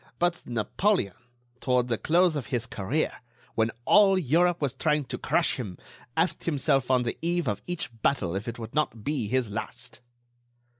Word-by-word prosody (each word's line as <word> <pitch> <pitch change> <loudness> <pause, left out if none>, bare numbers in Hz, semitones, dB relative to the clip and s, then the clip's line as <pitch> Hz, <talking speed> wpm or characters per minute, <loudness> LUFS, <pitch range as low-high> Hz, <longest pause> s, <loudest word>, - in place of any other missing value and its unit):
But 175 0 0
Napoleon, 120 - +1 0.5
toward 125 -1 +2
the 115 -3 -1
close 175 0 +3
of 135 -7 -3
his 120 -1 -1
career, 110 +11 -2 0.3
when 110 0 +2 0.2
all 200 -2 +6
Europe 175 +2 +3
was 140 -5 0
trying 150 -3 +1
to - - -5
crush - - +1
him, 100 -8 -5 0.4
asked 165 +3 +1
himself 135 -4 +1
on 130 -1 +4
the 120 - -3
eve 170 -2 0
of 105 - -1
each 175 -8 -3
battle 95 -11 +1
if 100 +4 -4
it 115 - -4
would 115 -1 -7
not 140 -8 -1
be 140 -5 -1
his 125 -1 0
last." 125 +4 -5
130 Hz, 170 wpm, -27 LUFS, 115-165 Hz, 0.5 s, all